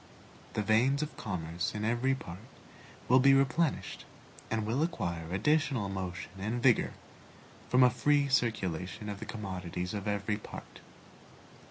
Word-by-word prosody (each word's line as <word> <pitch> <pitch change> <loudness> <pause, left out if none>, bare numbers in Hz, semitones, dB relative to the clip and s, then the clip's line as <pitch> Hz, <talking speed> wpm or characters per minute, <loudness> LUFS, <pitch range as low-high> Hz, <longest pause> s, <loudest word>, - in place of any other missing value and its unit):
The 105 - 0
veins 125 +7 +3
of 150 - -6
commerce 85 -2 -3
in 105 0 -2
every 120 +4 +2
part 90 -8 -8 0.7
will 130 +1 +6
be 135 +1 +6
replenished, 135 +3 +1 0.5
and 110 -1 -1
will 120 +7 0
acquire 85 - -2
additional 130 0 +1
motion 90 -2 -5
and 110 +5 -2
vigor 120 -1 +3 0.8
from 125 +1 +6
a 125 - +6
free 140 +4 +3
circulation 105 -6 -1
of 100 -1 -5
the - - -7
commodities 90 -3 -4
of 105 0 -4
every 105 0 0
part. 105 - -10
110 Hz, 140 wpm, -31 LUFS, 95-130 Hz, 0.8 s, will